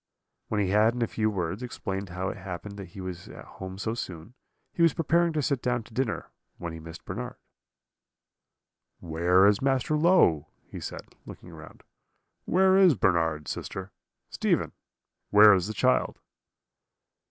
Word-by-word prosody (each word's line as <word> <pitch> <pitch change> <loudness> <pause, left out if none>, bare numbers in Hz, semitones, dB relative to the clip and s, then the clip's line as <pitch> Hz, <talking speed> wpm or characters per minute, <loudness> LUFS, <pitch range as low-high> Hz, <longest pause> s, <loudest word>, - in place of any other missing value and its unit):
"When 105 - -1
he 100 -2 +1
had, 110 +4 +3
in 120 - 0
a - - 0
few 110 0 0
words, 95 0 -3
explained 100 -5 -5
how 90 +2 -3
it - - -6
happened 95 +2 -7
that 100 -2 -8
he 95 - -7
was 90 -2 -7
at - - -11
home 95 0 -9
so 110 +3 -2
soon, 90 -2 -7 0.4
he - - -3
was 165 -3 +4
preparing 170 +1 +2
to 150 -2 -1
sit 140 -3 0
down 120 -2 -1
to 110 - -18
dinner, 125 -2 -2 0.3
when 85 -2 -6
he 80 - -8
missed 80 +1 -11
Bernard. 120 +6 -5 1.6
"'Where 85 +3 +3
is 100 0 +4
Master 135 +2 +1
Low?' 150 - +4 0.2
he - - -9
said, - - -8
looking 90 - -11
round. 80 -1 -13 0.6
'Where 190 +1 +4
is 185 -6 +6
Bernard, 80 -7 +1
sister? 95 0 -6 0.4
Stephen, - - 0 0.6
where 105 0 +8
is 95 -1 +1
the - - -3
child?' - - +1
100 Hz, 165 wpm, -27 LUFS, 90-125 Hz, 1.6 s, where